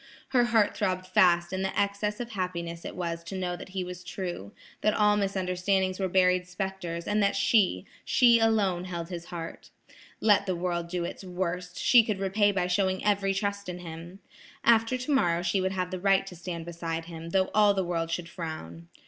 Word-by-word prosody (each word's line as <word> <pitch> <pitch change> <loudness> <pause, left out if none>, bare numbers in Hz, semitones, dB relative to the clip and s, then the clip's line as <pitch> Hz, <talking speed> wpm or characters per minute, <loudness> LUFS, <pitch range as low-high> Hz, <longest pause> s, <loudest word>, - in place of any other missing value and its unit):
Her 250 -2 +3
heart 225 -3 +2
throbbed 185 -2 -1
fast 180 -2 +3
in 185 - -1
the 190 - -1
excess 200 +1 -1
of 240 -1 -5
happiness 170 -4 -4
it - - -6
was 170 -2 -3
to 190 +2 -5
know 180 -1 -2
that 175 - -10
he 185 0 -3
was 180 0 -8
true, 175 - -5 0.3
that 215 - +2
all 210 -1 +4
misunderstandings 190 -1 0
were 190 - 0
buried 180 0 +3
spectres, 180 -2 -4
and 210 +1 +1
that 200 0 +2
she–she 225 - +3
alone 205 -6 +2
held 170 -2 -5
his 170 -2 -6
heart. 170 -2 -8 0.5
Let 205 -2 +3
the 185 - 0
world 170 -1 -2
do 175 0 -3
its 175 - -7
worst, 180 -1 -4
she 245 -2 +6
could 215 -3 -2
repay 200 +2 +2
by 185 -3 0
showing 185 +1 0
every 195 -1 +2
trust 200 -1 -2
in 180 - -5
him. 170 +1 -9 0.5
After 230 +2 +4
tomorrow 245 - +1
she 185 +2 +1
would 190 +1 -1
have 185 -1 -2
the 185 - -3
right 195 +1 +3
to 185 - -9
stand 170 -1 -6
beside 165 -1 -4
him, 165 -1 -8
though 190 +1 +1
all 210 -1 +5
the 190 -1 0
world 165 -1 -2
should 170 0 -3
frown. 155 - -7
185 Hz, 195 wpm, -28 LUFS, 175-200 Hz, 0.5 s, she